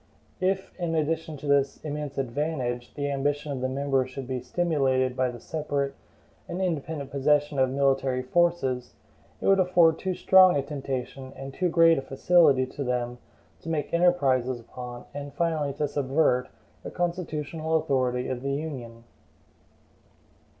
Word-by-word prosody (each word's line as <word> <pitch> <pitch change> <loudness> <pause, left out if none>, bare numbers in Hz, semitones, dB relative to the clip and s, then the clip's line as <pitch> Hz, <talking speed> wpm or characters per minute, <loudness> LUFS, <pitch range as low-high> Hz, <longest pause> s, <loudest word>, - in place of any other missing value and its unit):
If, 190 +1 -1
in 170 -2 -1
addition 160 0 -1
to 145 - -10
this 140 -1 +2
immense 150 -1 -4
advantage, 130 -2 -2
the 145 -1 -2
ambition 145 +2 -1
of 135 -2 -4
the 130 - 0
members 135 -1 0
should 130 0 -7
be 130 -1 -2
stimulated 130 -4 0
by 130 -1 +1
the 120 -1 -8
separate 145 -1 -2 0.6
and 175 - -4
independent 160 -5 -2
possession 145 +1 +2
of 130 -1 +3
military 135 -1 +1
forces, 135 -4 0 0.4
it - - -6
would 195 0 +5
afford 175 -3 +4
too 190 -1 -2
strong 185 0 +6
a 140 - 0
temptation 135 -2 -5
and 135 0 -8
too 180 +3 0
great 165 -2 +5
a - - -4
facility 140 -1 +4
to 140 +2 -6
them 125 -1 -2 0.4
to 165 - -8
make 155 -3 -2
enterprises 135 -8 +2
upon, 120 +1 -9
and 145 -1 -6
finally 155 -3 0
to 150 +1 -1
subvert, 140 -2 +1 0.3
the - - -7
constitutional 160 -2 -2
authority 130 -5 +1
of 125 -1 -3
the 140 +1 -2
Union. 130 -6 -6
140 Hz, 150 wpm, -27 LUFS, 130-160 Hz, 0.6 s, strong